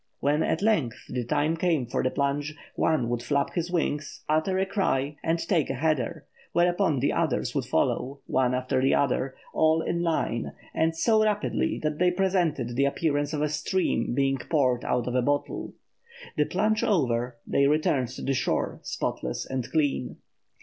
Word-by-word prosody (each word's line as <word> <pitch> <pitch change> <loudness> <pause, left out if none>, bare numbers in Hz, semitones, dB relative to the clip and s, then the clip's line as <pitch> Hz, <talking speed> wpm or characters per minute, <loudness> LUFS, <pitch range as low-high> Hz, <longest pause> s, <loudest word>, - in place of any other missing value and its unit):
When 145 +2 +2
at 165 - 0
length 160 - +2
the 125 -1 -2
time 150 +6 +1
came 165 -6 +1
for 120 - -1
the 130 - +1
plunge, 145 +3 -1 0.2
one 150 -7 +1
would 120 -1 -1
flap 140 +3 0
his 170 0 -2
wings, 155 -4 -2
utter 155 +5 +1
a 190 - +2
cry, 150 -8 0
and 165 +1 +1
take 165 -3 0
a 135 - -1
header, 155 +1 -1 0.3
whereupon 175 -3 +2
the 140 - +2
others - - 0
would - - -1
follow, 135 +2 0
one 130 -1 +1
after 130 0 0
the 135 - +3
other, 135 -1 0 0.2
all 160 +1 +3
in 170 - -1
line 160 -9 -1 0.2
and 160 0 +1
so 220 +4 +4
rapidly 210 -1 0
that 150 -1 -1
they 180 0 +4
presented 175 -10 0
the 140 +2 +3
appearance 145 0 0
of 150 -2 -1
a 150 - +1
stream 150 -5 0
being 135 0 +1
poured 130 -4 +1
out 125 -1 0
of 125 - -2
a 125 - +3
bottle. 145 +3 -2 0.6
The 150 - +2
plunge 215 +5 +1
over, 125 - +1
they 140 - +3
returned 145 -4 +2
to 130 - -8
the 135 - +1
shore, 130 - -1
spotless 60 - -3
and 130 -2 -3
clean. 145 -5 0
145 Hz, 175 wpm, -27 LUFS, 130-165 Hz, 0.6 s, so